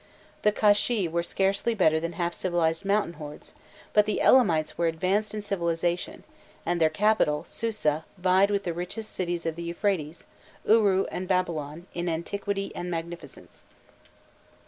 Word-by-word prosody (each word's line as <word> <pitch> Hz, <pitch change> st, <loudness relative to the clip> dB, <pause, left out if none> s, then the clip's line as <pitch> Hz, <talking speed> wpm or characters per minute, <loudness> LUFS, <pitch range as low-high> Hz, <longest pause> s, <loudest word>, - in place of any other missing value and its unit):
The 210 Hz, -, +4 dB
Kashshi 210 Hz, -1 st, +2 dB
were 170 Hz, +1 st, -1 dB
scarcely 195 Hz, +6 st, 0 dB
better 160 Hz, -6 st, +3 dB
than 170 Hz, +1 st, -4 dB
half 170 Hz, 0 st, -2 dB
civilized 170 Hz, -2 st, 0 dB
mountain 200 Hz, -2 st, +1 dB
hordes, 150 Hz, 0 st, -9 dB, 0.4 s
but 210 Hz, 0 st, +4 dB
the 215 Hz, -, 0 dB
Elamites 170 Hz, -12 st, +4 dB
were 170 Hz, -, +1 dB
advanced 185 Hz, +6 st, 0 dB
in 210 Hz, -, -4 dB
civilization, 175 Hz, -3 st, -2 dB, 0.4 s
and 175 Hz, 0 st, 0 dB
their 160 Hz, -, +5 dB
capital, 175 Hz, -4 st, +2 dB
Susa, 185 Hz, -9 st, -1 dB
vied 185 Hz, +2 st, +3 dB
with 200 Hz, -1 st, 0 dB
the 175 Hz, -, -2 dB
richest 180 Hz, +6 st, -5 dB
cities 175 Hz, -2 st, -2 dB
of 165 Hz, -1 st, -1 dB
the 170 Hz, -, -7 dB
Euphrates, 170 Hz, -2 st, -2 dB, 0.4 s
Uru 205 Hz, -4 st, +4 dB
and 185 Hz, -, -4 dB
Babylon, 170 Hz, -4 st, -1 dB
in 175 Hz, 0 st, -2 dB
antiquity 195 Hz, +4 st, -3 dB
and 175 Hz, -, -4 dB
magnificence. 165 Hz, -3 st, -7 dB
175 Hz, 145 wpm, -27 LUFS, 165-200 Hz, 0.4 s, their